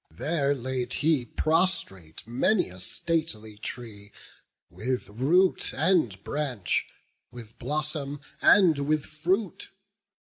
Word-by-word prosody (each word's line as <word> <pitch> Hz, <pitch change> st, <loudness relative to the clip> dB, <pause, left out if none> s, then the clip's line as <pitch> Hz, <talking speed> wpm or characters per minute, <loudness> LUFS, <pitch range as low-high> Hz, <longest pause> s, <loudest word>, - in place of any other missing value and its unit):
There 145 Hz, -, 0 dB
laid 130 Hz, -1 st, -3 dB
he 150 Hz, -4 st, +2 dB
prostrate 155 Hz, -, -1 dB
many 135 Hz, -, +1 dB
a 90 Hz, +1 st, -11 dB
stately 110 Hz, -, -3 dB
tree, 105 Hz, -4 st, -7 dB, 0.6 s
With 120 Hz, +9 st, -2 dB
root 155 Hz, -, +2 dB
and 145 Hz, -, +2 dB
branch, 135 Hz, -, -1 dB, 0.4 s
with 115 Hz, -2 st, -12 dB
blossom 145 Hz, +1 st, -2 dB, 0.2 s
and 175 Hz, -7 st, +6 dB
with 150 Hz, +1 st, 0 dB
fruit. 185 Hz, +6 st, -2 dB
140 Hz, 100 wpm, -27 LUFS, 115-160 Hz, 0.6 s, and